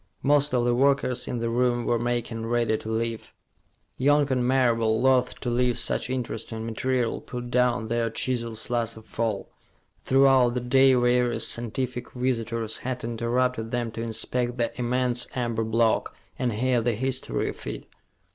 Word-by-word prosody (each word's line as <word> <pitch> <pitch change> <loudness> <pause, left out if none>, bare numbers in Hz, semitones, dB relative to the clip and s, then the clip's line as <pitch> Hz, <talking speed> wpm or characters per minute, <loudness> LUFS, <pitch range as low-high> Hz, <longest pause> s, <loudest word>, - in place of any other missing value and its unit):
Most 145 +1 +3
of 120 -1 +2
the 120 - +2
workers 135 -1 +1
in 125 - -3
the 115 0 -2
room 120 0 +1
were 120 - +1
making 120 -1 -2
ready 115 -2 +1
to 110 - -6
leave. 115 0 -3 0.7
Young 145 +1 +3
and 125 -1 +1
Marable, 115 -4 +2
loath 130 0 +2
to 125 - -2
leave 125 0 +1
such - - +1
interesting 115 -3 -4
material, 120 +1 -1
put 120 -1 -7
down 125 -2 +2
their 115 0 0
chisels 115 -1 -3
last 115 -2 -1
of 110 0 -15
all. 110 -4 -1 0.5
Throughout 130 -2 +4
the - - +1
day 130 +2 +4
various 125 0 +2
scientific 125 +2 -3
visitors 115 -3 -1
had 125 0 -4
interrupted 120 0 -1
them 120 -1 -2
to 115 - -6
inspect 120 +2 0
the 120 -1 0
immense 125 0 0
amber 115 -3 -1
block, 110 0 +1 0.2
and 125 -3 0
hear 125 +2 +1
the 120 +1 +1
history 130 +3 -1
of - - -9
it. - - -6
120 Hz, 160 wpm, -26 LUFS, 115-125 Hz, 0.7 s, Throughout